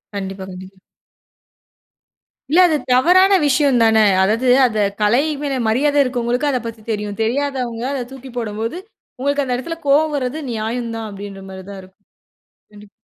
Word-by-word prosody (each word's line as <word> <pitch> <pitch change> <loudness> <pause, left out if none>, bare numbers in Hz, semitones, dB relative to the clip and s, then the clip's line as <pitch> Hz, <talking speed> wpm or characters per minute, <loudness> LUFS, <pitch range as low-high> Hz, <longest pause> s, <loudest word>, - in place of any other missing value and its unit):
கண்டிப்பா 195 -1 -5
கண்டிப்பா. 185 +1 -11 1.7
இல்ல 335 - +5
அது 310 - +1 0.2
தவறான 370 +9 +5
விஷயம் 280 -1 +3
தானே, 220 -1 +4 0.2
அதாவது 220 +6 +1 0.2
அந்த 220 -3 -1 0.2
கலை 215 +5 +3 0.2
மேல 275 -3 -2
மரியாதை 285 +6 +2
இருக்கவங்களுக்கு 250 +2 -1
அத 260 - +1
பத்தி 230 -1 -7
தெரியும், 210 -1 -4
தெரியாதவங்க 250 -2 -2
அத 270 -3 -2
தூக்கி 265 -1 -10
போடும்போது, 225 +5 -3 0.4
உங்களுக்கு 285 +2 0
அந்த 250 -1 -1
இடத்தில 330 +6 -5
கோபம் 300 +2 +3
வர்றது 255 +3 -3
நியாயம் 230 +1 -3
தான், 225 -1 -5
அப்படின்ற 195 -1 -9
மாதிரி 190 -1 -9
தான் 195 - -8
இருக்கும், 190 +2 -21 0.7
கண்டிப்பா. 210 0 -15
240 Hz, 145 wpm, -19 LUFS, 210-275 Hz, 1.7 s, இல்ல